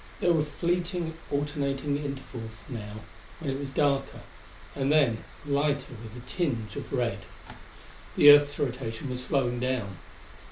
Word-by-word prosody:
There 175 - +4
were 160 - +3
fleeting 170 +2 -1 0.2
alternating 140 -1 -1
intervals, 125 -5 -6
now, 110 -4 -6 0.4
when 150 -5 -2
it 135 - -3
was 140 -1 -4
darker, 140 -1 +1 0.5
and 135 0 +1
then 130 -8 +3 0.2
lighter 140 -1 0
with 115 +1 -9
a 125 0 -11
tinge 120 - -2
of - - -6
red. 120 -6 0 1.0
The 145 - +10
Earth's 145 0 +6
rotation 125 -1 -3
was 125 0 -3
slowing 125 -3 +1
down. 120 -7 -2
135 Hz, 135 wpm, -28 LUFS, 120-145 Hz, 1.0 s, The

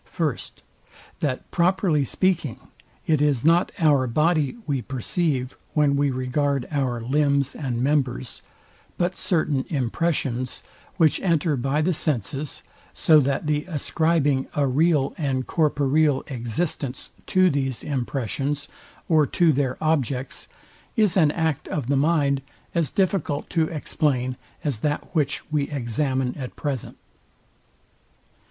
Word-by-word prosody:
First, 155 -6 -3 0.6
That, 135 -4 -2
properly 175 -4 +2
speaking, 170 -4 0 0.5
it 155 -3 +2
is 145 -4 +2
not 170 +2 +4
our 145 -7 +3
body 155 - +1
we 140 -4 -1
perceive, 130 +1 -1 0.2
when 145 -2 +3
we 140 0 +2
regard 135 +1 -1
our 130 -5 0
limbs 140 +2 +1
and 125 -5 -2
members, 130 -3 0 0.6
but 175 +1 0
certain 155 -6 0
impressions, 130 -3 -1 0.3
which 160 -5 +4
enter 165 -4 +2
by 135 +4 0
the 180 +3 +2
senses; 145 - -2 0.3
so 155 -2 +5
that 140 +1 0
the 150 0 0
ascribing 155 -4 +1
a 145 - +2
real 145 +1 +2
and 135 -4 -1
corporeal 145 -2 +2
existence 130 +2 -3 0.2
to 185 -1 +4
these 135 -3 -2
impressions, 140 +2 -2 0.4
or 155 -3 +4
to 165 +1 +3
their 130 -2 0
objects, 140 -5 -1 0.5
is 210 -6 +3
an 160 -6 +5
act 160 -2 -1
of 145 - -2
the 140 - +3
mind 140 -2 +2 0.3
as 165 -5 +1
difficult 185 -6 -1
to 165 -2 +2
explain, 135 -5 -1 0.3
as 140 -8 -1
that 150 +4 -2
which 145 -4 0
we 150 -2 0
examine 130 -1 -1
at 130 -2 -6
present. 140 -6 -4
145 Hz, 125 wpm, -24 LUFS, 130-160 Hz, 0.6 s, so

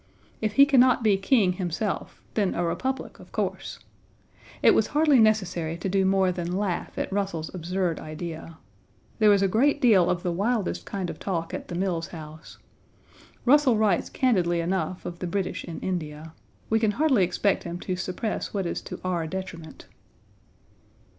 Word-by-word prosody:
If 215 -1 -1
he 280 +4 +7
can 275 -3 +4
not 250 -1 +4
be 210 -3 +4
king 195 -1 +2
himself, 180 +3 -4
then 200 -4 0
a 175 - 0
republic, 260 +10 -3
of - - -15
course. - - -3 0.9
It - - +7
was - - +2
hardly 300 -4 +5
necessary 185 -7 +1
to 170 - -4
do 190 0 +2
more 190 -1 +3
than 175 0 -3
laugh 195 -3 -3
at - - -3
Russell's 195 -6 -2
absurd 180 -1 -2
idea. 160 +1 -7 0.6
There 215 -1 +6
was 200 -1 +5
a - - +4
great 265 +9 +2
deal 200 -9 +5
of 175 -1 -1
the 180 - 0
wildest 205 +3 -1
kind 185 -4 -3
of 160 - -11
talk 170 -4 -3
at - - -5
the 175 - -6
Mills 175 -3 -1
House. 155 -1 -11 0.9
Russell 265 -3 +5
writes 210 -5 +1
candidly 180 -9 +1
enough 185 +1 -2
of 170 0 -6
the 180 - -3
British 190 +1 -2
in 165 - -7
India. 160 -3 -4 0.3
We 225 - +2
can 220 -2 +1
hardly 275 -9 +3
expect 180 +3 +1
him 170 0 -5
to 185 - -2
suppress 185 +5 -4
what 195 -2 -1
is 170 - -3
to - - -8
our 175 -3 -1
detriment. 165 -3 -7
185 Hz, 175 wpm, -26 LUFS, 170-215 Hz, 0.9 s, he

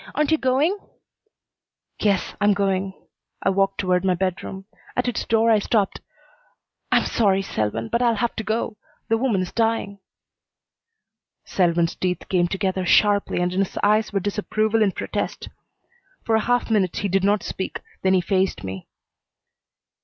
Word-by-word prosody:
Aren't 300 0 +1
you 315 - +3
going?" 280 +10 +1 1.2
"Yes 200 -3 +1
I'm 205 0 +4
going." 195 -1 0 0.5
I 195 - +3
walked 195 0 +1
toward 180 -1 +1
my 185 -1 +2
bedroom. 190 +1 -3 0.3
At 250 - 0
its 245 - -2
door 225 0 +3
I 215 - +5
stopped. 205 -1 0 0.9
"I'm - - +4
sorry, 195 -4 +2
Selwyn, 110 - -2
but 235 - 0
I'll 235 -2 +3
have 235 +2 -1
to 220 - -2
go. 220 0 -2 0.3
The 225 0 +2
woman 225 -7 +1
is 180 - -7
dying." 225 -3 -1 1.5
Selwyn's 170 -2 +1
teeth 180 -2 -3
came 175 -2 +2
together 190 0 -1
sharply 200 0 +3
and 180 0 0
in 185 - -1
his 195 - -1
eyes 215 +1 +3
were 200 - 0
disapproval 215 +2 0
and 200 -3 +2
protest. - - -4 0.8
For 225 - 0
a 220 - +5
half 245 -1 +1
minute 190 -5 +1
he 200 - -1
did 195 0 +1
not 205 +1 +2
speak, 190 - -4 0.2
then 190 0 +3
he 185 - +3
faced 190 - 0
me. 95 -1 -6
200 Hz, 160 wpm, -23 LUFS, 185-220 Hz, 1.5 s, I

